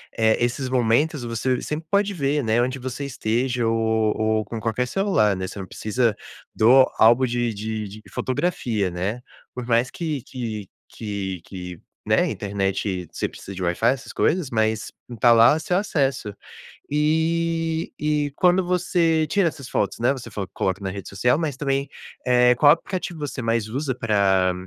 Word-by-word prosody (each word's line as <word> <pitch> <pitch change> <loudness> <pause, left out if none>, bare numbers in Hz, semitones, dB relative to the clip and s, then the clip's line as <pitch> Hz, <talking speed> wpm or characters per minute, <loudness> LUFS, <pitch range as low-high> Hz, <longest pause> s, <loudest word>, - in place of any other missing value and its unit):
eh, 110 -1 +3
esses 130 +2 -3
momentos 130 +3 +1
você 120 +2 -1
sempre 155 +1 -5
pode 200 0 +2
ver, 145 -3 0
né, 110 +2 +2
onde 130 +2 -1
você 130 +2 -5
esteja 125 -1 -1
ou 110 -1 +1
ou 110 0 0
com 115 - -6
qualquer 115 +3 -1
celular, 120 - +2
né, 95 0 -4
você - - -9
não 95 - -5
precisa 110 +3 -1 0.4
do 130 +4 +6
álbum 120 +4 +6
de 120 -1 -1
de 110 0 -4
de 105 +2 -11
fotografia, 120 - -1
né. 100 +7 -3 0.3
Por 125 -1 -5
mais 120 +1 +2
que 155 -4 -3
que 110 -6 -6 0.2
que 100 -5 -5
que, 90 -3 -8 0.3
né, - - +2
internet 95 -2 -2
você - - -2
precisa 100 - -10
de 95 - -6
Wi-fi 85 0 -1
essas 135 0 -6
coisas, 175 -5 +1
mas, 110 -2 0 0.2
e 120 - -7
tá 120 +1 +6
lá 115 +5 +6
o 160 - -2
seu 180 +2 -1
acesso. 135 - 0 0.6
Eh, 160 +2 0
e 150 -1 0
quando 180 +1 +3
você 175 -3 +2
tira 185 0 +2
essas 140 -5 -8
fotos, 100 +1 -1
né, 125 +3 +3
você 130 -4 -7
falou 100 -3 -5
que - - -49
coloca 95 +1 -1
na 95 - -2
rede 100 0 -7
social 125 +9 +1
mas 150 -5 -2
também, 140 -1 -1 0.4
eh, 125 0 +5
qual 145 +2 +7
aplicativo 175 -1 -4
você 145 -2 -4
mais 115 -1 0
usa 130 +3 -2
pra 100 -5 +2
120 Hz, 175 wpm, -23 LUFS, 110-145 Hz, 0.6 s, qual